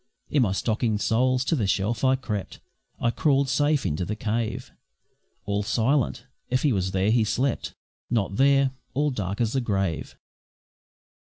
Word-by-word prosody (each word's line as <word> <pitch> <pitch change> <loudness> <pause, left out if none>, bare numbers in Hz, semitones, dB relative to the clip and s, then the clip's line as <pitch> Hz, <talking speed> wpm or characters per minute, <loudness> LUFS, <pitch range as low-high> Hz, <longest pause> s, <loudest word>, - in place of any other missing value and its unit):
In 145 - +3
my 110 -6 +2
stocking 110 +2 0
soles 125 +4 +1
to 165 - +1
the 110 -9 0
shelf 100 +5 0
I 130 0 +4
crept, 105 -7 -5 0.4
I 120 - +1
crawl'd 140 0 +2
safe 145 +1 +2
into 75 +4 -1
the 105 +4 -3
cave 110 +1 -3 0.7
All 100 0 0
silent 120 +4 0 0.2
if 130 +1 0
he 145 -4 +3
was 95 -2 0
there 95 +2 +1
he 115 -1 +4
slept 125 +4 -1 0.3
Not 100 -4 0
there. 135 0 +4 0.2
All 145 +1 +1
dark 100 -5 -3
as 115 -2 0
the 135 - +1
grave. 95 -8 -2
115 Hz, 160 wpm, -25 LUFS, 105-135 Hz, 0.7 s, I